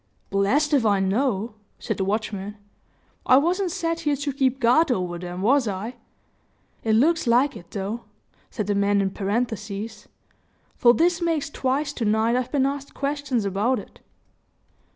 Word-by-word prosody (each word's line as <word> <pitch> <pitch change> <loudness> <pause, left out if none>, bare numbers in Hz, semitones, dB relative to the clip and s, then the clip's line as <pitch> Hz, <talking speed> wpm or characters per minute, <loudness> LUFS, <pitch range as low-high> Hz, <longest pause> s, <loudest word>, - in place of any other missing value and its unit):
"Blessed 255 +11 +2
if 275 -5 +4
I 205 -3 +3
know," 210 +2 0 0.2
said - - -3
the 195 - 0
watchman. 205 0 -3 0.7
"I, 255 - +7
wasn't 355 +6 +1
set 335 -2 -2
here 295 -3 0
to 285 0 -3
keep 265 -1 +1
guard 255 +6 +4
over 180 -6 -2
them 180 +1 -6
was 260 +2 +3
I? 210 +5 -4 0.9
It 220 -1 +2
looks 320 +5 +3
like 250 +4 +3
it, 175 -5 -11
though," 205 +4 -4 0.4
said 215 - -3
the 205 - 0
man 200 0 +2
in 195 -1 0
parenthesis; 215 0 -3 0.7
"for 240 -1 +5
this 345 +2 +2
makes 325 -4 -1
twice 280 +2 -1
to 240 - -4
night 220 +3 +2
I've 250 0 -1
been 275 -3 +2
asked 280 0 -4
questions 280 -5 -1
about 205 +7 +1
it." 205 - -10
240 Hz, 160 wpm, -24 LUFS, 205-280 Hz, 0.9 s, I